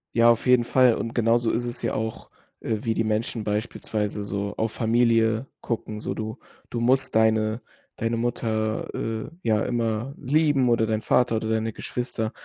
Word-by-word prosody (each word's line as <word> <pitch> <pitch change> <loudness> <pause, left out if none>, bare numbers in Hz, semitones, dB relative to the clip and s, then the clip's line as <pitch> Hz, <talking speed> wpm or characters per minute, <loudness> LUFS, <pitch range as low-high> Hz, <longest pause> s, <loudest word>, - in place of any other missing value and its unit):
Ja, 115 0 +6
auf 115 +2 +2
jeden 125 -1 +5
Fall 125 -1 +4
und 115 - -4
genauso 115 0 +2
ist 120 +1 -1
es 120 0 -4
ja - - -1
auch, 110 0 -4 0.3
äh, 110 - -1
wie 115 -2 +1
die 115 - 0
Menschen 110 +1 -1
beispielsweise 105 -1 -2
so 100 0 -3
auf 110 0 -1
Familie 115 +1 +2
gucken, 110 -2 -4
so - - -3
du 110 0 -5 0.3
du 120 - -3
musst 130 +2 +2
deine 110 +1 +2 0.4
deine 115 +1 -1
Mutter, 110 -2 -1
äh, 110 -1 -3
ja 110 -1 +2
immer 115 +1 -1
lieben 145 -2 +2
oder 115 -1 +3
deinen 110 0 -1
Vater 115 +1 +2
oder 110 0 -2
deine 110 0 0
Geschwister, 120 -3 -3
115 Hz, 175 wpm, -25 LUFS, 110-120 Hz, 0.4 s, Ja